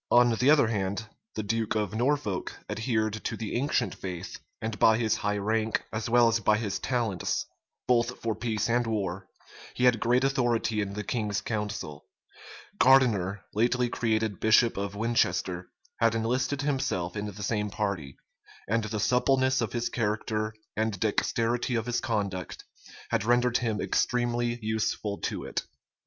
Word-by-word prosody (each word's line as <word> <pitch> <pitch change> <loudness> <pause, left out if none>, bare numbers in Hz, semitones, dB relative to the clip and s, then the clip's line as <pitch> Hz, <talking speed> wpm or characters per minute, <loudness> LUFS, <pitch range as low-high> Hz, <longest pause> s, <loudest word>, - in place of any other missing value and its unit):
On 120 0 +6
the 125 +5 +2
other 150 -4 +6
hand, 100 0 -2 0.3
the 110 - -2
duke 110 +1 -1
of 105 -3 -1
Norfolk 115 -5 -1
adhered 110 -2 -1
to - - -3
the 110 -2 -4
ancient 140 +5 0
faith, 90 -3 -6 0.2
and 110 -2 -4
by 110 0 +6
his 110 -3 +1
high 105 0 -1
rank, 110 +2 0
as 110 +1 -2
well 120 0 +6
as 115 0 +2
by 105 0 +3
his 105 -3 -2
talents, 115 -8 -1 0.4
both 120 0 +2
for 115 -1 -1
peace 110 -1 -1
and 120 0 +1
war, 95 -4 -2 0.5
he 125 - -2
had 125 -3 +5
great 125 +3 +2
authority 120 -5 +1
in 100 -1 -3
the 105 +1 -4
king's 105 -3 -1
council: 105 -9 -4 0.7
Gardiner, 105 -8 +4
lately 120 +3 +2
created 110 -4 0
bishop 110 +1 +4
of 100 0 -3
Winchester, 95 -5 0 0.3
had 115 -1 +3
enlisted 125 +5 0
himself 130 -12 -1
in 105 0 -3
the 105 0 -7
same 105 0 -1
party; 95 -10 -3 0.5
and 115 +1 +1
the 110 0 -3
suppleness 130 +3 +2
of 115 - -2
his 120 0 0
character, 110 -1 -1 0.2
and 110 -3 -1
dexterity 115 +3 0
of 115 -1 -1
his 120 -1 -1
conduct, 100 -7 -3 0.5
had - - +1
rendered 120 +1 +3
him 110 -3 -1
extremely 120 -1 0
useful 110 -1 -1
to - - -3
it. - - -2
110 Hz, 155 wpm, -28 LUFS, 105-120 Hz, 0.7 s, On